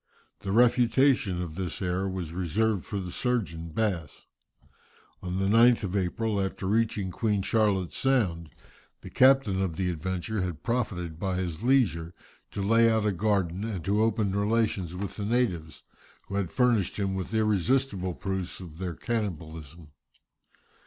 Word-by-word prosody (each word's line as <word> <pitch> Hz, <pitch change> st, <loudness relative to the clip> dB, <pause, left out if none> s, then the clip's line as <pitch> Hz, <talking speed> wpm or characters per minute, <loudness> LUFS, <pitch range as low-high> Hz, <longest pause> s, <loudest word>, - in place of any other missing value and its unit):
The 95 Hz, -, -4 dB
refutation 120 Hz, -4 st, +3 dB
of 80 Hz, -3 st, -7 dB
this 90 Hz, 0 st, -4 dB
error 95 Hz, +1 st, -1 dB
was 90 Hz, -4 st, -5 dB
reserved 95 Hz, +3 st, 0 dB
for 100 Hz, -, -3 dB
the 90 Hz, -2 st, -5 dB
surgeon, 95 Hz, -9 st, -2 dB
Bass. 85 Hz, -, -2 dB, 1.0 s
On 90 Hz, 0 st, -3 dB
the 95 Hz, -, 0 dB
9th 115 Hz, +3 st, +5 dB
of 95 Hz, -1 st, -3 dB
April 100 Hz, +2 st, 0 dB
after 95 Hz, 0 st, -3 dB
reaching 105 Hz, -2 st, 0 dB
Queen's 105 Hz, -1 st, 0 dB
Charlotte's 100 Hz, -5 st, +1 dB
Sound, 95 Hz, -, +1 dB, 0.5 s
the -, -, -10 dB
captain 130 Hz, -8 st, +4 dB
of 90 Hz, -4 st, -1 dB
the 90 Hz, +1 st, -1 dB
Adventure 95 Hz, +5 st, -3 dB
had 85 Hz, -4 st, -4 dB
profited 90 Hz, -9 st, -2 dB
by 95 Hz, -1 st, -1 dB
his 90 Hz, -2 st, -3 dB
leisure 95 Hz, -, +2 dB, 0.3 s
to 100 Hz, -, -4 dB
lay 115 Hz, +3 st, +5 dB
out 110 Hz, -1 st, +1 dB
a 105 Hz, -, +2 dB
garden 95 Hz, -1 st, 0 dB
and 100 Hz, -7 st, -4 dB
to 100 Hz, +3 st, +2 dB
open 110 Hz, -3 st, +1 dB
relations 100 Hz, -4 st, 0 dB
with 95 Hz, +1 st, -5 dB
the 105 Hz, -, -3 dB
natives, 90 Hz, -, -1 dB, 0.4 s
who -, -, -9 dB
had 100 Hz, -3 st, -1 dB
furnished 120 Hz, -7 st, +2 dB
him 100 Hz, -2 st, -1 dB
with 95 Hz, +1 st, -4 dB
irresistible 105 Hz, -2 st, +1 dB
proofs 95 Hz, -2 st, -4 dB
of 85 Hz, -3 st, -10 dB
their 90 Hz, -3 st, -3 dB
cannibalism. 80 Hz, -, -5 dB
95 Hz, 150 wpm, -28 LUFS, 90-110 Hz, 1.0 s, 9th